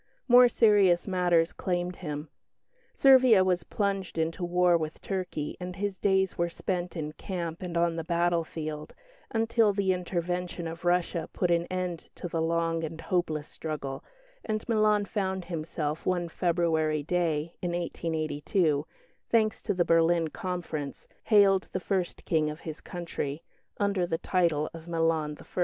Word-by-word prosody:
More 245 Hz, -1 st, +8 dB
serious 205 Hz, -7 st, +4 dB
matters 175 Hz, -3 st, +2 dB
claimed 180 Hz, -1 st, -2 dB
him. 150 Hz, -2 st, -5 dB, 0.7 s
Servia 255 Hz, -7 st, +7 dB
was 180 Hz, -2 st, +1 dB
plunged 195 Hz, 0 st, -2 dB
into 165 Hz, +2 st, -1 dB
war 180 Hz, 0 st, +3 dB
with 155 Hz, -2 st, -2 dB
Turkey, 180 Hz, -6 st, -3 dB
and 180 Hz, 0 st, -6 dB
his 195 Hz, -1 st, -3 dB
days 190 Hz, -2 st, +1 dB
were 170 Hz, 0 st, +1 dB
spent 180 Hz, +1 st, -3 dB
in 150 Hz, -1 st, -3 dB
camp 170 Hz, -1 st, -5 dB
and 175 Hz, -2 st, -3 dB
on 170 Hz, -1 st, +2 dB
the 165 Hz, -, -2 dB
battlefield, 165 Hz, -3 st, -1 dB, 0.3 s
until 225 Hz, -1 st, +2 dB
the 195 Hz, -2 st, +2 dB
intervention 180 Hz, -1 st, -3 dB
of 165 Hz, +2 st, -8 dB
Russia 175 Hz, -2 st, +1 dB
put 180 Hz, -2 st, 0 dB
an 170 Hz, 0 st, +2 dB
end 180 Hz, -2 st, -4 dB
to -, -, -5 dB
the 165 Hz, -1 st, -2 dB
long 165 Hz, 0 st, 0 dB
and 160 Hz, +1 st, -5 dB
hopeless 160 Hz, -3 st, -1 dB
struggle, 145 Hz, -4 st, -5 dB, 0.4 s
and 215 Hz, -1 st, -3 dB
Milan 215 Hz, -2 st, +3 dB
found 190 Hz, -3 st, -2 dB
himself 155 Hz, -2 st, -3 dB
one 175 Hz, -2 st, 0 dB
February 160 Hz, -3 st, +1 dB
day 165 Hz, -1 st, 0 dB
in 175 Hz, -, -1 dB
1882, 160 Hz, -2 st, -1 dB, 0.4 s
thanks 220 Hz, -2 st, +2 dB
to -, -, -1 dB
the 175 Hz, -1 st, +2 dB
Berlin 165 Hz, 0 st, +3 dB
Conference, 160 Hz, -6 st, -5 dB, 0.2 s
hailed 200 Hz, -3 st, +5 dB
the 185 Hz, -, 0 dB
first 185 Hz, -1 st, -2 dB
King 155 Hz, -2 st, +1 dB
of 150 Hz, +1 st, -7 dB
his 160 Hz, -2 st, -7 dB
country, 165 Hz, -3 st, -5 dB, 0.4 s
under 200 Hz, -3 st, +1 dB
the 165 Hz, -, -1 dB
title 165 Hz, -4 st, +1 dB
of 165 Hz, 0 st, -10 dB
Milan 165 Hz, -3 st, 0 dB
I. -, -, -11 dB
175 Hz, 150 wpm, -28 LUFS, 160-185 Hz, 0.7 s, More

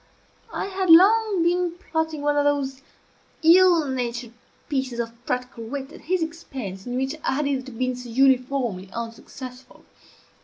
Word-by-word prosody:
I -, -, -3 dB
had 380 Hz, -2 st, -2 dB
long 395 Hz, +2 st, +6 dB
been 350 Hz, 0 st, +1 dB
plotting 320 Hz, -4 st, -3 dB
one 295 Hz, 0 st, +2 dB
of 290 Hz, -, +3 dB
those 275 Hz, -2 st, 0 dB, 0.6 s
ill 340 Hz, -1 st, +6 dB
natured 240 Hz, -2 st, -3 dB, 0.4 s
pieces 260 Hz, -4 st, -2 dB
of 230 Hz, -1 st, -3 dB
practical 250 Hz, -2 st, -3 dB
wit 270 Hz, +4 st, -5 dB
at -, -, -12 dB
his 360 Hz, +1 st, 0 dB
expense 260 Hz, -, -7 dB
in 245 Hz, -, -3 dB
which 265 Hz, +2 st, -1 dB
I -, -, +1 dB
had 295 Hz, +2 st, 0 dB
hitherto 265 Hz, -2 st, -2 dB
been 255 Hz, +2 st, -1 dB
so 245 Hz, -1 st, -9 dB
uniformly 250 Hz, -6 st, +1 dB
unsuccessful. 250 Hz, +3 st, -9 dB
270 Hz, 150 wpm, -24 LUFS, 250-325 Hz, 0.6 s, long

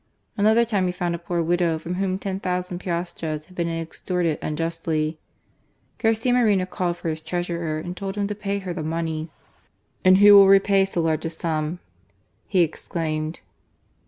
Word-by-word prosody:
Another 220 Hz, +3 st, +4 dB
time 200 Hz, -5 st, 0 dB
he -, -, 0 dB
found 175 Hz, -1 st, -2 dB
a 170 Hz, -, -3 dB
poor 170 Hz, 0 st, -2 dB
widow 170 Hz, -1 st, +1 dB
from 165 Hz, +3 st, -5 dB
whom 190 Hz, 0 st, -1 dB
lo.ooo 185 Hz, -2 st, -3 dB
piastres 170 Hz, -4 st, -4 dB
had 185 Hz, -, -18 dB
been 170 Hz, -1 st, -1 dB
extorted 165 Hz, 0 st, -2 dB
unjustly. 160 Hz, 0 st, -2 dB, 0.8 s
Garcia 225 Hz, +2 st, +2 dB
Moreno 210 Hz, -7 st, +3 dB
called 180 Hz, -2 st, -2 dB
for 170 Hz, -, -3 dB
his 160 Hz, 0 st, -4 dB
treasurer, 170 Hz, -1 st, -2 dB
and 175 Hz, +3 st, -5 dB
told 195 Hz, 0 st, -5 dB
him 205 Hz, -1 st, -1 dB
to 210 Hz, -, -2 dB
pay 200 Hz, -1 st, -3 dB
her 190 Hz, -3 st, -4 dB
the 170 Hz, -, -4 dB
money. 160 Hz, 0 st, -3 dB, 0.7 s
"And 185 Hz, 0 st, +7 dB
who 205 Hz, +1 st, +8 dB
will 200 Hz, -1 st, +9 dB
repay 195 Hz, 0 st, +5 dB
so 185 Hz, -3 st, -2 dB
large 160 Hz, 0 st, 0 dB
a -, -, 0 dB
sum?" 160 Hz, 0 st, -2 dB, 0.7 s
he 185 Hz, -3 st, +3 dB
ex 160 Hz, -, -5 dB
claimed. 155 Hz, -2 st, -3 dB
175 Hz, 170 wpm, -23 LUFS, 165-195 Hz, 0.8 s, will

